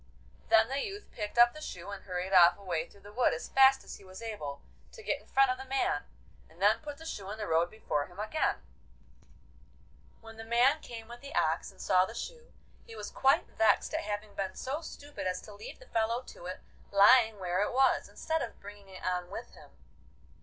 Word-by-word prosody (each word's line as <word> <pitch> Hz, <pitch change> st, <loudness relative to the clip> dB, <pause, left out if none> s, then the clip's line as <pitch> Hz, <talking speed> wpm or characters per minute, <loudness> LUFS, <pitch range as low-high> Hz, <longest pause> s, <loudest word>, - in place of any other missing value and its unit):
Then 220 Hz, 0 st, +6 dB
the 270 Hz, +2 st, -2 dB
youth 410 Hz, +1 st, -7 dB
picked 210 Hz, +2 st, -5 dB
up 240 Hz, 0 st, +7 dB
the 305 Hz, -, -10 dB
shoe 180 Hz, -, -7 dB
and 200 Hz, -, -8 dB
hurried 185 Hz, 0 st, -3 dB
off 175 Hz, -1 st, +7 dB
away 175 Hz, -5 st, -3 dB
through 200 Hz, -, -19 dB
the 205 Hz, +1 st, -13 dB
wood 245 Hz, +2 st, +3 dB
as -, -, -7 dB
fast 270 Hz, 0 st, +6 dB
as -, -, -9 dB
he -, -, -17 dB
was 185 Hz, 0 st, -11 dB
able, 205 Hz, -12 st, -5 dB, 0.3 s
to 445 Hz, -, -11 dB
get -, -, -1 dB
in -, -, -23 dB
front 270 Hz, -1 st, +4 dB
of 255 Hz, -, -3 dB
the 265 Hz, -, -7 dB
man, 275 Hz, +10 st, 0 dB, 0.4 s
and -, -, -20 dB
then -, -, +4 dB
put 295 Hz, -2 st, -7 dB
the 325 Hz, -, -12 dB
shoe 200 Hz, -11 st, -6 dB
in 210 Hz, -, -5 dB
the 215 Hz, -, -4 dB
road 165 Hz, 0 st, +2 dB
before 150 Hz, -9 st, -2 dB
him 180 Hz, +2 st, -15 dB
again. 220 Hz, +9 st, -1 dB, 1.6 s
When 225 Hz, -1 st, -13 dB
the 225 Hz, -, -7 dB
man 245 Hz, +7 st, +3 dB
came 225 Hz, -2 st, -9 dB
with 240 Hz, +1 st, -11 dB
the 280 Hz, 0 st, -9 dB
ox -, -, +1 dB
and -, -, -19 dB
saw 185 Hz, 0 st, +4 dB
the 225 Hz, -, -9 dB
shoe, 480 Hz, -, -7 dB, 0.3 s
he 225 Hz, -, -12 dB
was 210 Hz, -1 st, -6 dB
quite 270 Hz, +4 st, +3 dB
vexed 220 Hz, -, +2 dB
at -, -, 0 dB
having 205 Hz, 0 st, -5 dB
been 190 Hz, -1 st, -3 dB
so 280 Hz, +5 st, -3 dB
stupid 290 Hz, -, -7 dB
as 185 Hz, 0 st, -1 dB
to 210 Hz, -, -12 dB
leave 205 Hz, -, -9 dB
the -, -, -16 dB
fellow 230 Hz, -, 0 dB
to 175 Hz, -, -11 dB
it 185 Hz, -, -6 dB, 0.3 s
lying 220 Hz, +2 st, +6 dB
where 180 Hz, 0 st, -1 dB
it 205 Hz, -, 0 dB
was, 265 Hz, +1 st, +3 dB
instead 320 Hz, -1 st, -2 dB
of -, -, -6 dB
bringing 205 Hz, -1 st, -12 dB
it 185 Hz, -, -10 dB
on 180 Hz, -1 st, -1 dB
with -, -, -7 dB
him. -, -, -15 dB
220 Hz, 225 wpm, -31 LUFS, 190-265 Hz, 1.6 s, up